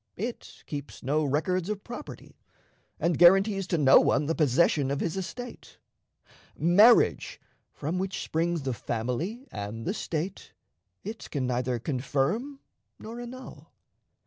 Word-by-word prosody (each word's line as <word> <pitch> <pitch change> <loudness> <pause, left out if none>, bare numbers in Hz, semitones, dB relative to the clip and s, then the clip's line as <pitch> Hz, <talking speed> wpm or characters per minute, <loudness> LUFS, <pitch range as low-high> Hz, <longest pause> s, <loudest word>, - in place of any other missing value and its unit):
It 230 +5 -6
keeps 145 -1 -7
no 150 +4 +1
records 165 +6 0
of 210 -2 -3
property, 245 +5 -10 0.6
and 170 -1 0
guarantees 195 +2 +5
to 170 - 0
no 140 -3 +7
one 145 +2 +2
the 160 - 0
possession 150 -1 +2
of 140 0 -1
his 170 - -2
estate. 245 +6 -7 0.8
Marriage, 205 +8 +4 0.3
from 160 +5 -3
which 190 0 -3
springs 165 -1 -1
the 130 -2 -1
family 125 - -3
and 105 +2 -6
the 190 - -1
State, 175 -1 -4 0.5
it 220 +2 -7
can 140 -4 -2
neither 125 0 -1
confirm 145 - -2 0.4
nor 230 +2 -8
annul. 255 +2 -10
170 Hz, 130 wpm, -28 LUFS, 140-200 Hz, 0.8 s, no